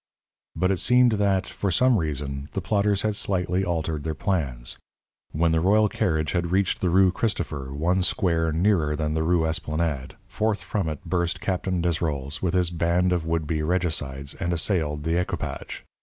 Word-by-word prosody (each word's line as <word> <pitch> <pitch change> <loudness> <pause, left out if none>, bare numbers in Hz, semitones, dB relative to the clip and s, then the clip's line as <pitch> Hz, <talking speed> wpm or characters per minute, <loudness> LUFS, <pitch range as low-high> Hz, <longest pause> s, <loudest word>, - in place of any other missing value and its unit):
But 95 +1 +1
it 95 - 0
seemed 125 +3 +5
that, 100 -3 +1
for 100 - -3
some 120 +5 +3
reason, 70 -2 -3
the 95 - -2
plotters 100 +1 +1
had 105 -1 0
slightly 95 -2 0
altered 80 -4 -2
their 80 0 -3
plans. 70 - -2 0.5
When 80 +2 +1
the 80 - +2
royal 105 +4 +4
carriage 80 -5 0
had 85 -2 -1
reached 95 0 +1
the 90 - +2
Rue 95 +1 +5
Christopher, 75 - -2
one 85 +6 +1
square 85 -3 +1
nearer 80 -3 +2
than 75 0 -1
the 80 - 0
Rue 85 0 +2
Esplanade, 80 -3 -2
forth 105 -1 -1
from 95 -6 -2
it 75 +2 -7
burst 85 0 -1
Captain 90 -1 -1
Desrolles, 75 -5 -1
with 95 0 0
his 90 -1 +2
band 85 +2 +1
of 85 -2 -2
would 80 -1 0
be 75 0 -1
regicides, 75 -5 -1
and 85 -2 -2
assailed 80 -4 -1
the 80 +2 +1
equipage. 90 - -4
85 Hz, 175 wpm, -25 LUFS, 80-95 Hz, 0.5 s, seemed